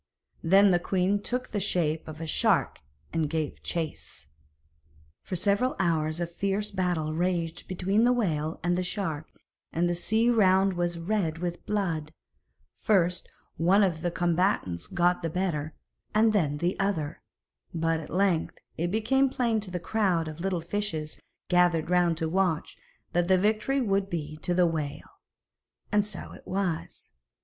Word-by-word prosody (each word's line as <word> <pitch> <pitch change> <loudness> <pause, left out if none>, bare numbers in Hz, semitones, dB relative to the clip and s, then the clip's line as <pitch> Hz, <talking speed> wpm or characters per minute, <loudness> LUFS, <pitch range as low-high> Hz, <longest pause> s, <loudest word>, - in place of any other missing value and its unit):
Then 195 +4 +5
the 175 - +4
queen 190 +3 +1
took 250 +4 -2
the 210 - -2
shape 165 -5 0
of 155 -1 -8
a 165 - -4
shark 155 - +1 0.3
and 160 -2 0
gave 155 -1 -3
chase. 160 - -5 1.0
For 185 - -5
several 200 +8 +1
hours 160 -3 0
a 175 - 0
fierce 200 +4 -2
battle 175 -5 -1
raged 170 -1 -1
between 195 +4 +1
the 245 - +5
whale 160 -10 0
and 175 0 +2
the 180 - 0
shark, 170 -5 -3 0.4
and 170 +2 +1
the 175 - +1
sea 220 +7 +2
around 195 -3 +4
was 175 -1 -1
red 170 -2 -1
with 175 0 -4
blood; 170 -7 -1 0.7
first 180 -4 +2 0.3
one 190 +5 +4
of 170 -5 0
the 175 - 0
combatants 175 - 0
got 180 -1 +2
the 165 - -2
better, 160 -3 -2 0.4
and 220 0 +4
then 150 -8 +1
the 175 +4 -1
other, 170 -6 -1 0.5
but 165 -1 0
at 155 - -9
length 185 -2 +1 0.2
it 170 +2 0
became 265 +7 +2
plain 235 -4 +1
to 205 -2 -5
the 180 -1 -3
crowd 180 -3 +1
of 155 +1 -7
little 185 -2 -1
fishes 165 -4 -3 0.3
gathered 175 -2 +3
round 175 -2 +3
to 160 -1 -1
watch, 175 -2 0 0.4
that 175 0 +2
the 190 0 +5
victory 215 +7 +1
would 195 -4 +1
be 155 -3 -4
to 175 +3 -1
the 180 0 +5
whale. 155 -4 -4 0.7
And 210 0 +4
so 210 -3 -8
it - - -14
was. 185 -4 -3
180 Hz, 160 wpm, -28 LUFS, 165-200 Hz, 1.0 s, Then